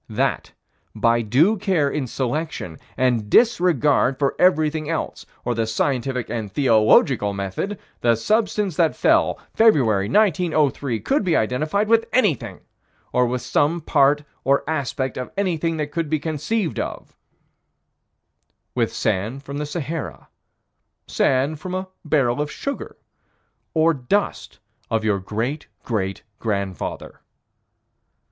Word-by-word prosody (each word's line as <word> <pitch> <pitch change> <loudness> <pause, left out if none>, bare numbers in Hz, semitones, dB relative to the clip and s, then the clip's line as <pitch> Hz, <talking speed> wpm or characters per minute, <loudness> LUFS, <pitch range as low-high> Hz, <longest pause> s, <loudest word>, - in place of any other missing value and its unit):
That, - - -1 0.4
by 115 0 +2
due 145 - +3
care 185 -6 +1
in 140 -2 -2
selection, 130 - -3 0.2
and 120 -5 +1
disregard 155 - +3
for 140 -2 +1
everything 155 -4 +2
else, 165 - -4 0.2
or 120 - 0
the 115 -1 -1
scientific 125 +2 -1
and 110 -4 -4
theological 110 -3 +3
method, 100 - -3 0.2
the 120 -1 +3
substance 210 - 0
that 165 -3 +3
fell, - - +2
February, 115 - +3
1903, 155 - +2
could 275 -2 +1
be 180 -3 +1
identified 155 - 0
with 230 +1 +3
anything, 210 - 0 0.5
or 125 0 +3
with 125 0 -3
some 160 +4 +1
part 145 -2 +3 0.2
or 140 +1 +2
aspect 135 -4 -2
of 125 - -5
anything 165 -4 0
that 150 -1 -3
could 165 -2 -2
be 155 - +2
conceived 160 +6 -2
of - - -6 1.6
With - - 0
sand 110 +9 -2
from 140 +1 -6
the 150 - -3
Sahara, 160 0 -5 0.8
sand 140 +3 +1
from 185 +2 -5
a 185 0 -4
barrel 145 -4 +1
of 150 - -2
sugar, 280 - -5 0.8
or 160 +1 +4
dust 130 - -2 0.3
of 110 -1 0
your 105 -2 +1
great 115 +10 -3 0.2
great 95 -5 -2 0.2
grandfather. 100 -4 -4
145 Hz, 125 wpm, -22 LUFS, 120-165 Hz, 1.6 s, or